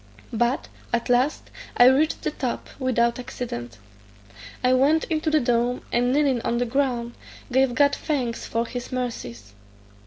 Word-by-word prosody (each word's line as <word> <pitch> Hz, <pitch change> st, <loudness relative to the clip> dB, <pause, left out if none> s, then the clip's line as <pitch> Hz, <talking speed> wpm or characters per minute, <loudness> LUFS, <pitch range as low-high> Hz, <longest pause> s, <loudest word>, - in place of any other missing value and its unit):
But, 240 Hz, +3 st, 0 dB, 0.2 s
at 235 Hz, 0 st, -1 dB
last, 250 Hz, +4 st, +1 dB, 0.3 s
I 245 Hz, -, +8 dB
reached 275 Hz, +5 st, +3 dB
the -, -, -1 dB
top, 255 Hz, -5 st, -4 dB
without 235 Hz, -2 st, +1 dB
accident. 120 Hz, -, -6 dB, 0.9 s
I 250 Hz, 0 st, +4 dB
went 285 Hz, +5 st, +3 dB
into 315 Hz, 0 st, 0 dB
the 310 Hz, 0 st, +3 dB
dome, 240 Hz, -1 st, 0 dB
and 245 Hz, +1 st, +2 dB
kneeling 275 Hz, -3 st, +2 dB
on 235 Hz, -, -1 dB
the 245 Hz, -, +1 dB
ground, 240 Hz, -2 st, -1 dB, 0.4 s
gave 260 Hz, 0 st, +2 dB
God 285 Hz, -1 st, +4 dB
thanks 255 Hz, -7 st, -2 dB
for 230 Hz, +1 st, -1 dB
his 245 Hz, +1 st, -6 dB
mercies. 120 Hz, -, -5 dB
245 Hz, 150 wpm, -24 LUFS, 235-270 Hz, 0.9 s, I